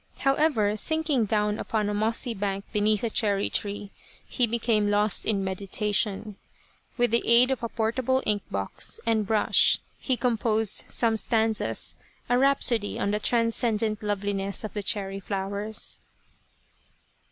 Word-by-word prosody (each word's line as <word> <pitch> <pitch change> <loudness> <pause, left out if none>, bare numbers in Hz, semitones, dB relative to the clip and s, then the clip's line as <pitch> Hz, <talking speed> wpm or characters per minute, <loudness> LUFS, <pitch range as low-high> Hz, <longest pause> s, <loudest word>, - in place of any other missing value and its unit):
However, 270 -7 +2
sinking 305 -1 +1
down 210 0 0
upon 215 -2 -1
a 205 - -1
mossy 225 +3 -1
bank 200 -1 -3
beneath 210 0 +1
a 230 - 0
cherry 205 -2 +1
tree, 205 0 -3 0.3
he 245 -3 0
became 225 -2 +1
lost 205 -1 +1
in 200 -3 +1
meditation. 200 +2 -2 0.6
With 245 -2 +2
the 235 - +3
aid 240 +3 +5
of 265 - -2
a 230 - -3
portable 250 +4 0
ink 210 -1 +1
box 100 0 -2
and 220 -3 +1
brush 215 -1 +3 0.2
he 260 -3 -1
composed 225 -3 0
some 225 -2 +1
stanzas, 220 -1 +1 0.3
a 245 0 +3
rhapsody 255 -6 +2
on 200 - -1
the 210 - 0
transcendent 225 -2 +1
loveliness 200 -1 -2
of 215 - -6
the 210 - -3
cherry 195 -1 -1
flowers. 200 +2 -1
215 Hz, 140 wpm, -26 LUFS, 205-235 Hz, 0.6 s, aid